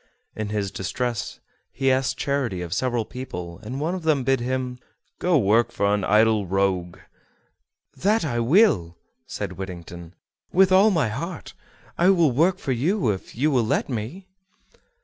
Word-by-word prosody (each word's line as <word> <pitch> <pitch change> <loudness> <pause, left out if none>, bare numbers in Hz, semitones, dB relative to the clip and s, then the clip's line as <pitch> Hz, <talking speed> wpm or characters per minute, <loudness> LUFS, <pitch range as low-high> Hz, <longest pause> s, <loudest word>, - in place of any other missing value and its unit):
In 110 -1 -4
his 105 -2 -2
distress 115 +3 -3 0.3
he 135 0 +1
asked 130 0 0
charity 130 -11 -1
of 85 -1 -5
several 120 0 0
people, 90 -10 -7
and 120 +5 -6
one 160 +4 -1
of 185 - -4
them 155 -5 +1
bid 135 0 +2
him 125 0 -3 0.4
"Go 180 - +1
to - - +6
work 115 +1 +3
for 100 -3 +1
an 105 -1 0
idle 105 0 +3
rogue." 95 -2 0 1.0
"That 210 -1 +1
I 120 -5 -1
will," 115 - +3 0.3
said - - -5
Whittington, 85 -2 -8 0.4
"with 190 +1 +4
all 195 +3 +6
my 160 - +1
heart; 160 +9 -6 0.5
I 175 +2 +5
will 170 -7 +4
work 170 +9 +2
for 140 - -4
you 140 - +1
if 95 - -7
you 145 +6 +1
will 125 -4 +2
let 110 - 0
me." 125 - -5
120 Hz, 165 wpm, -24 LUFS, 100-155 Hz, 1.0 s, to